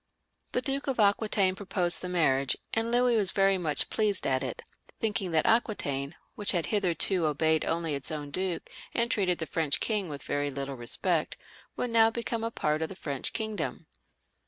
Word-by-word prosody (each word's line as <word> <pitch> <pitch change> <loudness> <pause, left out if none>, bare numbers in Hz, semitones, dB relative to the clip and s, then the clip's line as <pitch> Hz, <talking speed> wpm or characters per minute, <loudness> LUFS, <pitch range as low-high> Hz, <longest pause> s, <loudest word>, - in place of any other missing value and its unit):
The 250 - 0
Duke 275 +1 -1
of 265 -3 -1
Aquitaine 205 -2 +3
proposed 180 -3 -1
the 180 - -4
marriage, 140 -6 +2 0.2
and 225 +1 +1
Louis 245 0 +3
was 200 -5 +5
very 195 -1 +3
much 155 -4 0
pleased 210 -3 +1
at 130 -1 +1
it, 130 -3 -4 0.4
thinking 215 -4 0
that 160 -2 +2
Aquitaine, 155 - 0 0.2
which 205 -1 0
had 175 -3 +1
hitherto 185 -3 +1
obeyed 155 +1 +2
only 165 -2 -1
its 140 -1 -3
own 145 -2 -5
duke, 185 +1 -2 0.3
and 235 0 +1
treated 185 -6 +1
the 160 - -2
French 155 -3 0
king 210 -5 -1
with 145 -2 -7
very 145 0 -1
little 140 0 -4
respect, 155 +7 0 0.4
would 245 - -2
now 225 -1 +6
become 230 0 -3
a 230 - 0
part 155 -8 -1
of 160 - -1
the 195 - -8
French 140 -7 -4
kingdom. 220 -2 -3
185 Hz, 180 wpm, -29 LUFS, 150-220 Hz, 0.4 s, now